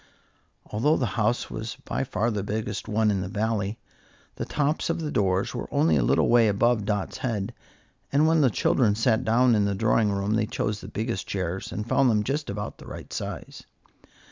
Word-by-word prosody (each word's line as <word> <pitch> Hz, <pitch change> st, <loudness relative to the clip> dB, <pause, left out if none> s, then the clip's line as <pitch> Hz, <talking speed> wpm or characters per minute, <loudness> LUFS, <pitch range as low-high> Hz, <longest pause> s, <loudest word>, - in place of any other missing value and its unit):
Although 135 Hz, +9 st, +1 dB
the 130 Hz, -, 0 dB
house 115 Hz, +2 st, 0 dB
was 110 Hz, +1 st, -5 dB
by -, -, -1 dB
far 115 Hz, 0 st, 0 dB
the 105 Hz, -2 st, -2 dB
biggest 105 Hz, +1 st, -3 dB
one 110 Hz, 0 st, +2 dB
in 95 Hz, -2 st, 0 dB
the 90 Hz, -, -3 dB
Valley, 105 Hz, +1 st, -1 dB, 0.6 s
the -, -, -3 dB
tops 150 Hz, +3 st, 0 dB
of 165 Hz, +1 st, 0 dB
the 155 Hz, -2 st, -3 dB
doors 95 Hz, -1 st, +1 dB
were -, -, -5 dB
only 80 Hz, 0 st, +3 dB
a 70 Hz, -, +3 dB
little -, -, +3 dB
way 120 Hz, -2 st, +5 dB
above 105 Hz, +1 st, +2 dB
Dot's 105 Hz, -2 st, -2 dB
head, 115 Hz, -4 st, -2 dB, 0.6 s
and 145 Hz, +3 st, +4 dB
when 160 Hz, 0 st, +4 dB
the 135 Hz, -, +5 dB
children 110 Hz, -1 st, +2 dB
sat 115 Hz, +2 st, +2 dB
down 120 Hz, +2 st, +4 dB
in 105 Hz, -2 st, +3 dB
the 100 Hz, -1 st, 0 dB
drawing 110 Hz, 0 st, +2 dB
room 100 Hz, +1 st, -1 dB
they 110 Hz, 0 st, +1 dB
chose 105 Hz, 0 st, -2 dB
the -, -, -9 dB
biggest 115 Hz, +2 st, -3 dB
chairs, 95 Hz, -1 st, -3 dB
and 105 Hz, +5 st, -4 dB
found 130 Hz, +1 st, +3 dB
them 105 Hz, -2 st, +2 dB
just 145 Hz, +5 st, -2 dB
about 105 Hz, +1 st, -5 dB
the -, -, -12 dB
right -, -, -9 dB
size. -, -, -6 dB
110 Hz, 200 wpm, -26 LUFS, 100-120 Hz, 0.6 s, way